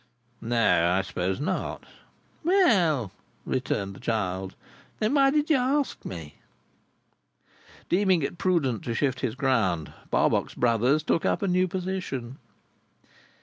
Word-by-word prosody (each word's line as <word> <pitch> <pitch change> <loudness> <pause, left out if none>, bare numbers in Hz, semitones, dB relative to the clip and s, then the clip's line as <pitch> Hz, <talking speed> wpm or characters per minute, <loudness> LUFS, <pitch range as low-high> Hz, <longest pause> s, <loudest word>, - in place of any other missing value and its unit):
"No, 115 -7 +2
I 95 +1 +1
suppose 95 +2 -2
not." 145 - -3 0.6
"Well," 185 - +3 0.3
returned 100 -6 -2
the - - -12
child, 95 -4 -2 0.4
"then 215 +5 0
why 275 -2 +5
did 300 +2 +1
you 300 - +5
ask 270 +3 0
me?" 80 -5 -8 1.5
Deeming 185 -3 +2
it 170 - -4
prudent 145 - +1
to 115 - -2
shift 130 -1 0
his 125 -3 -2
ground, 115 - 0 0.2
Barbox - - +1
Brothers 125 +5 +2
took 165 - +1
up - - 0
a - - +1
new 185 0 +2
position. 180 -9 -4
135 Hz, 125 wpm, -26 LUFS, -, 1.5 s, why